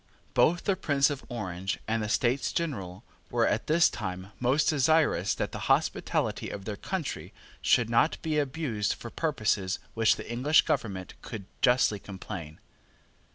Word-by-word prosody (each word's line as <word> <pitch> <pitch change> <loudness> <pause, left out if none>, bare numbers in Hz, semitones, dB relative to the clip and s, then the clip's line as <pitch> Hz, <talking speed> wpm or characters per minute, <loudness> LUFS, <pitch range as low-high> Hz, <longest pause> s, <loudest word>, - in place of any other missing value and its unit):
Both 175 +2 +3
the 195 - +2
Prince 145 -6 +2
of 140 - -5
Orange 95 -5 -3
and 110 0 0
the 105 - -3
States 125 +3 +1
General, 105 - -3 0.3
were, 120 -1 +2
at 110 - 0
this 160 +2 +5
time, 95 -2 -5
most 130 +5 +2
desirous 155 +2 +3
that - - -2
the - - -5
hospitality - - +1
of 100 -1 -7
their 105 - -3
country 170 - -4 0.3
should 120 -3 +3
not 115 +7 +2
be 155 -2 +1
abused 135 -7 -1
for 115 - -9
purposes 105 - 0
of - - -14
which 115 -1 +4
the - - -8
English 130 +7 +4
government 95 -5 -2
could 105 -5 -7 0.2
justly 125 -4 +3
complain. 90 -5 -8
120 Hz, 155 wpm, -28 LUFS, 100-150 Hz, 0.3 s, this